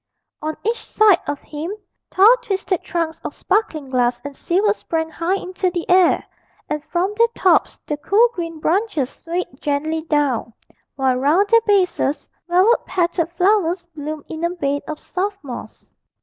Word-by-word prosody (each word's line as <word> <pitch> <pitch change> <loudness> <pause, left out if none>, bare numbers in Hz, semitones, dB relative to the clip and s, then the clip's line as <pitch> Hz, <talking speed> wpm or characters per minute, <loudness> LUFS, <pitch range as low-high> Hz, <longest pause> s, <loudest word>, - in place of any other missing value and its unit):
On 310 0 -3
each 460 +2 -1
side 425 -4 +4
of 290 -1 -4
him 305 +4 -5 0.4
tall 420 +6 +6
twisted 385 -5 -2
trunks 330 -2 -3
of - - -5
sparkling 310 -10 -1
glass 245 -1 +1
and 285 -1 -6
silver 400 +8 +1
sprang 320 -5 -3
high 340 +4 -1
into 370 -1 -2
the 350 -1 -4
air, 365 -1 +4 0.4
and 300 -1 -3
from 360 +5 -1
their 465 +2 +4
tops 370 - +3
the 295 - -3
cool 415 +10 +4
green 330 -2 -5
branches 330 - 0
swayed 340 -5 -5
gently 310 +2 -1
down, 290 -7 0 0.4
while 265 -2 +1
round 315 +10 +3
their 460 0 +6
bases 365 -8 +1 0.2
velvet 370 +7 +4
petalled 345 -2 0
flowers 365 -1 +2
bloomed 300 0 -6
in 320 +1 -6
a 340 - +2
bed 285 -5 -2
of 310 - -4
soft 395 +5 -3
moss. 255 -4 -9
340 Hz, 160 wpm, -20 LUFS, 295-385 Hz, 0.4 s, tall